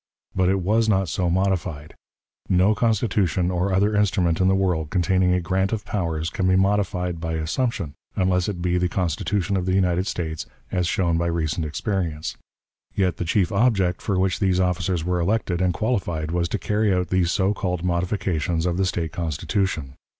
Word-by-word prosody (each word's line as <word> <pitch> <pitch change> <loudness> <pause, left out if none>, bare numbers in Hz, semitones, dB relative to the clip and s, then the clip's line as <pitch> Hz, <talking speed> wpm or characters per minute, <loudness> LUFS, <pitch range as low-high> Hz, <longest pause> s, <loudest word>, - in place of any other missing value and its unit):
But 95 -1 +2
it 95 0 +1
was 110 +4 +2
not 95 -4 +2
so 90 +2 0
modified. 90 -5 -1 0.6
No 95 +3 +4
Constitution 105 -6 +1
or 90 +2 0
other 100 +3 +2
instrument 95 -4 +2
in 95 - +4
the 95 - +4
world 90 -5 0
containing 90 +1 +2
a 90 - +2
grant 95 +3 0
of 110 -3 -3
powers 85 -5 -2
can 95 - 0
be 95 - +4
modified 95 -3 +1
by 80 0 -3
assumption, 80 - -2 0.2
unless 90 0 +1
it 90 -4 -4
be 90 0 +1
the 90 0 +1
Constitution 95 +3 -1
of 90 -1 -1
the 95 - +2
United 90 0 +1
States, 80 -4 -3 0.2
as 90 -2 0
shown 85 -3 +1
by 85 - 0
recent 80 -1 -1
experience. 80 -2 -3 0.6
Yet 90 -4 +1
the 90 - -3
chief 90 +2 +1
object 100 -4 +2
for 100 - -1
which 95 0 +1
these 95 -2 +2
officers 90 -2 0
were 90 0 0
elected 90 -1 0
and 90 -1 +3
qualified 85 -8 -1
was 85 0 0
to - - -1
carry 105 0 +1
out 90 -1 0
these 90 -2 +2
so 95 +1 +2
called 90 -4 -2
modifications 85 -2 -1
of 90 -1 0
the 95 0 +2
State 85 -4 -2
Constitution. 80 -2 -2
90 Hz, 185 wpm, -23 LUFS, 85-95 Hz, 0.6 s, No